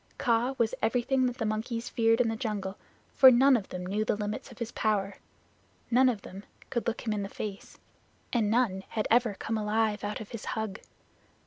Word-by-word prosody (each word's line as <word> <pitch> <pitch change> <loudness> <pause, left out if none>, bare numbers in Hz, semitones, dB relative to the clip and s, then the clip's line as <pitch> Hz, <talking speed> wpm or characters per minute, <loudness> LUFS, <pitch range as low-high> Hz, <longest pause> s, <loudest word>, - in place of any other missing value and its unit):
Kaa 240 +3 +1
was 230 -1 +1
everything 250 +3 +2
that 245 0 -4
the 225 - -2
monkeys 230 +2 -2
feared 225 0 +2
in 245 - +3
the 225 - -1
jungle, 210 -5 -3 0.4
for 260 - +9
none 260 +2 +6
of 210 -5 -2
them 180 0 -5
knew 205 +4 -1
the 215 - 0
limits 210 +3 -4
of 240 - -13
his 235 -2 -4
power, 200 -2 -1 0.7
none 255 +2 +5
of 215 -5 -3
them 195 +2 -9 0.3
could 235 - -2
look 235 - -1
him 220 - -1
in 210 - -2
the 200 - -4
face, 205 -1 -7 0.6
and 225 -4 +2
none 215 -5 +1
had 215 - -2
ever 235 -3 +3
come 225 +2 -3
alive 215 0 0
out 205 0 -3
of 215 - -8
his 230 - -6
hug. 220 -2 -3
220 Hz, 205 wpm, -29 LUFS, 210-240 Hz, 0.7 s, for